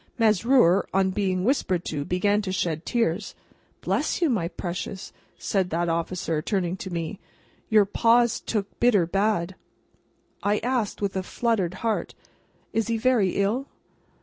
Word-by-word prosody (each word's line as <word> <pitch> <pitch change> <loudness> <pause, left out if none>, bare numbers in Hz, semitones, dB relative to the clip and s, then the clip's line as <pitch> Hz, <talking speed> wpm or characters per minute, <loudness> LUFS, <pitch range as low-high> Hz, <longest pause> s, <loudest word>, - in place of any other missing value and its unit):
Mesrour, 220 -3 +4
on 190 -1 +3
being 185 -2 0
whispered 190 -8 0
to, 145 -2 -3
began 200 +6 +1
to 195 -2 -4
shed 170 -3 -2
tears. 210 -5 -1 0.5
"Bless - - 0
you, 335 -5 +2
my 185 -8 0
precious!" 180 +2 -6 0.2
said 190 -3 -1
that 170 +1 0
officer, 165 -1 -1
turning 180 0 -1
to 190 - -6
me; 170 +3 -4 0.5
"your 215 -2 +5
Pa's 230 +3 +3
took 205 -3 -4
bitter 220 -8 +4
bad!" 195 0 0 0.9
I 205 +1 +1
asked, 240 -5 -1
with 195 -1 -1
a 190 - 0
fluttered 190 -3 -1
heart, 225 -2 -1 0.6
"Is 225 0 0
he 230 -1 0
very 225 -5 +2
ill?" 220 +8 0
195 Hz, 145 wpm, -25 LUFS, 180-225 Hz, 0.9 s, your